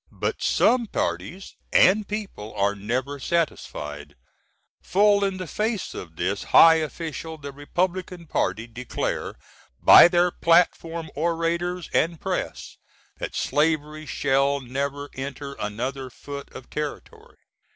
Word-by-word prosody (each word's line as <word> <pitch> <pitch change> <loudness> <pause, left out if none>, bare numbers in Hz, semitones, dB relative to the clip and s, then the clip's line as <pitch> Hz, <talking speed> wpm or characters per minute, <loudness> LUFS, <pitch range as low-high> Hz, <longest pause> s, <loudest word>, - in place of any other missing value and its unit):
But - - -3
some 240 -2 +3
parties 95 - -3 0.2
and 200 +2 +5
people 200 - -6
are 100 0 +1
never 125 +8 -3
satisfied. 75 - -3 0.7
Full 205 +2 +3
in 195 -1 -1
the 185 - -5
face 215 +4 -2
of 80 -3 -9
this 95 +4 -2
high 165 0 +7
official 160 +1 -5
the 140 -2 -8
Repub^n 175 +4 -3
Party 115 -5 -1
declare 120 +1 -4 0.4
by - - +9
their 175 0 +2
Platform 165 -1 +2
orators, 170 +2 -1 0.2
& 165 -2 -14
Press, - - -4 0.4
that - - -5
slavery 155 0 0
shall 140 +1 +1
never 140 +2 -4
enter 140 +1 -6
another 125 +6 -4
foot 140 +3 -9
of 130 - -12
territory. 150 -1 -6
150 Hz, 120 wpm, -24 LUFS, 130-175 Hz, 0.7 s, by